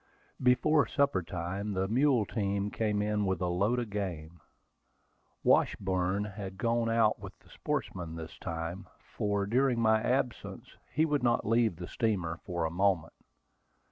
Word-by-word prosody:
Before 130 +4 +4
supper 140 -10 +1
time, 95 +4 -4
the 95 0 0
mule 125 0 +3
team 100 -1 -1
came 105 -2 0
in 105 0 0
with 95 -2 0
a 90 - -1
load 100 +7 +1
of 120 -4 -3
game. 85 -5 -4 1.0
Washburn 95 +1 +2
had 95 -2 -7
gone 115 +2 +1
out 115 -1 +3
with - - -10
the - - -24
sportsmen 85 -3 -4
this 80 -1 -8
time, 85 +2 -5 0.3
for 100 -1 0
during 125 +3 +2
my 110 -1 +4
absence 125 -1 -2 0.2
he 155 +5 +2
would 150 -2 0
not 120 -1 +2
leave 115 -3 +2
the 90 +1 -7
steamer 90 -7 -1
for 85 -3 -1
a 80 - -2
moment. 90 -2 +1
100 Hz, 150 wpm, -31 LUFS, 90-115 Hz, 1.0 s, Before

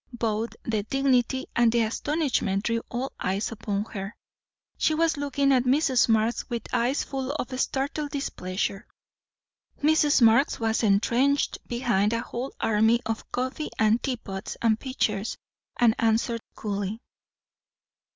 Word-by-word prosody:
Both 225 0 -1
the 220 -2 -1
dignity 260 +2 +1
and 235 -1 +4
the 235 0 +2
astonishment 230 -5 0
drew 230 0 0
all 255 +2 -3
eyes 195 +5 -1
upon 205 -2 -3
her. 195 0 -5 0.6
She 310 - +1
was 325 0 +2
looking 280 -1 +1
at 255 -1 +3
Mrs. 260 -2 +3
Marx 225 +3 +1
with 235 -3 -3
eyes 250 +4 +1
full 270 -1 -4
of 255 -3 -4
startled 285 +3 -1
displeasure. 195 -8 -3 1.0
Mrs. 300 -1 +4
Marx 230 +5 +4
was 225 -1 +1
entrenched 235 +7 +2
behind 235 -4 +1
a 230 - 0
whole 245 +4 -5
army 220 +2 +3
of 225 0 -4
coffee 260 +5 -2
and 220 +2 +3
tea 260 -3 -1
pots 195 -1 -7
and 225 -1 +2
pitchers, 220 -6 -2 0.4
and 235 -2 +5
answered 230 +1 +1
coolly. 205 0 -3
235 Hz, 135 wpm, -26 LUFS, 220-270 Hz, 1.0 s, and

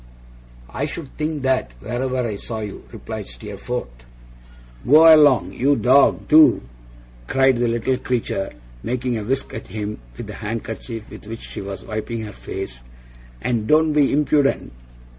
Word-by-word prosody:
'I 145 - -2
should 150 -2 -8
think 155 -2 -3
that, 130 - 0
wherever 125 - -2
I 105 - -3
saw 110 +2 -5
you,' 105 -2 -7
replied - - -7
Steerforth. - - -7 0.8
'Go 160 +4 +8
along, 145 -5 +4
you 140 +3 +2
dog, 135 +2 +4
do!' 155 0 +6 0.6
cried 135 - +3
the 120 - +2
little 120 +3 0
creature, 115 -5 -2 0.3
making 125 - -2
a - - -5
whisk 135 +5 -2
at - - -7
him 105 -1 -5 0.2
with - - -6
the - - -8
handkerchief 110 +1 -6
with - - -11
which 115 +1 -7
she - - -7
was 95 -1 -7
wiping 110 +1 -4
her 105 -2 -7
face, 95 -14 -7 0.6
'and 115 -3 -1
don't 155 0 +4
be 145 -2 +3
impudent! 145 -1 +1
125 Hz, 150 wpm, -21 LUFS, 110-140 Hz, 0.8 s, Go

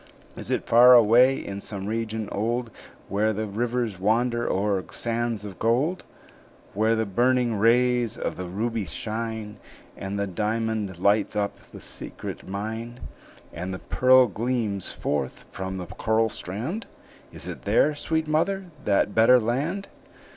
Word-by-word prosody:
"Is - - -6
it - - -1
far 125 +2 +8
away, 120 +3 +6
in 100 0 -6
some 100 -2 -6
region 110 0 -3
old, 115 +3 -1 0.4
Where 105 +3 +1
the 110 +1 -2
rivers 115 -1 -2
wander 120 +4 +1
o'er 100 -1 0
sands 115 -2 -2
of 100 -3 -9
gold? 130 +11 +1 0.7
Where 110 +3 +2
the 110 0 0
burning 120 +4 +2
rays 120 +2 +2
of - - -3
the 90 0 -5
ruby 110 +2 -2
shine, 110 +1 -4 0.4
And 95 +1 -5
the 100 - 0
diamond 105 0 -2
lights 100 +3 +2
up 100 -1 -1
the - - -14
secret - - -7
mine, 110 +4 -5 0.5
And 90 +4 -4
the - - -5
pearl 130 +5 +5
gleams 110 -3 -2
forth 70 -3 -3
from 95 0 -5
the 90 - -5
coral 110 +5 0
strand? 120 - -5 0.4
Is - - -9
it - - -6
there, 150 - +3
sweet 160 +2 -2
mother, 175 +4 0
that 100 0 +2
better 120 +3 +6
land?" 145 - -2
110 Hz, 145 wpm, -25 LUFS, 100-120 Hz, 0.7 s, far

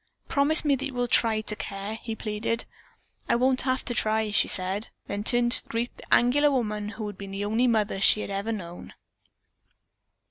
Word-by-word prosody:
"Promise 290 +3 +2
me 285 -2 +3
that 275 - -5
you 265 - -10
will 245 0 0
try 220 -1 +2
to 215 -1 -4
care," 200 +1 -6
he 225 0 -6
pleaded. 220 +2 -3 0.6
"I - - +3
won't 255 +2 +2
have 260 0 -1
to 240 - -1
try," 220 -1 0
she 215 - +4
said, 190 +3 0 0.2
then 200 +1 -4
turned 240 +1 +4
to - - +4
greet 230 +2 -3
the - - -16
angular 285 +5 +4
woman 210 -6 -2
who 220 0 -6
had 205 -2 -8
been 200 -1 -7
the 195 +1 -4
only 225 +4 +1
mother 215 -4 0
she 210 - +5
had - - -6
ever 200 +3 -3
known. 175 -5 -8
220 Hz, 200 wpm, -26 LUFS, 205-245 Hz, 0.6 s, she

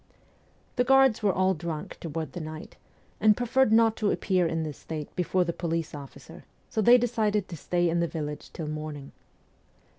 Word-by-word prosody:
The 245 - +4
guards 270 -3 +4
were 205 -2 +3
all 185 +1 +2
drunk 160 -2 -6
toward 160 0 -5
night, 155 -1 -7 0.4
and 215 -1 +5
preferred 245 0 +2
not 225 0 +5
to 210 - +1
appear 185 -3 +1
in 165 0 -1
this 150 -3 -6
state 155 -2 -7
before 180 +1 +1
the 170 -1 -2
police 165 -2 -3
officer, 140 -2 -11 0.3
so 220 - 0
they 240 +4 +7
decided 215 -4 0
to 175 - -6
stay 175 +3 0
in 170 +1 +1
the 170 - +1
village 150 -3 -6
till 160 - -6
morning. 150 -2 -6
175 Hz, 175 wpm, -27 LUFS, 155-215 Hz, 0.4 s, they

